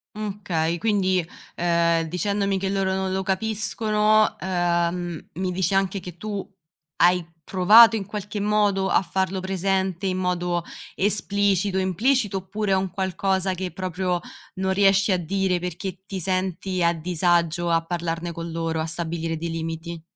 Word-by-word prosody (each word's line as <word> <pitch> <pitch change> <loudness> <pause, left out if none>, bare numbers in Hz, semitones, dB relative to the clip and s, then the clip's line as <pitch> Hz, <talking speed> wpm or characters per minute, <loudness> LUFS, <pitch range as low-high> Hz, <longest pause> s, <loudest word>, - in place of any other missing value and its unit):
Mh, 210 -1 -5
okay. 165 -1 0
Quindi, 190 -4 +1 0.3
ehm, 170 -1 +2
dicendomi 195 +3 0
che 190 0 -2
loro 195 -1 0
non 190 0 -1
lo 190 - 0
capiscono, 215 +1 +1
ehm, 175 -2 -1
mi 185 0 -2
dici 185 +1 0
anche 195 0 +1
che 180 -1 -10
tu 205 0 -5 0.5
hai 180 0 +4 0.2
provato, 215 +5 +7
in 200 -3 -3
qualche 205 0 -5
modo, 205 -2 +2
a - - +4
farlo 190 +2 -1
presente 190 0 -1
in 185 0 -1
modo 175 -1 -1 0.3
esplicito, 200 -1 +1
implicito, 205 +3 +1
oppure 195 +2 -3
è - - +5
un 190 0 0
qualcosa 190 0 -1
che 185 0 -4
proprio 185 -1 -2 0.4
non 190 0 0
riesci 195 0 +4
a 185 - +3
dire 185 +1 0
perché 180 +1 -5
ti 195 -2 -5
senti 185 0 -1
a 170 0 +4
disagio 170 0 +1
a 165 0 +2
parlarne 170 0 -3
con 165 0 -6
loro, 165 -1 -2
a - - -1
stabilire 165 0 -3
dei 170 +1 -4
limiti. 165 0 -5
185 Hz, 150 wpm, -24 LUFS, 175-195 Hz, 0.5 s, provato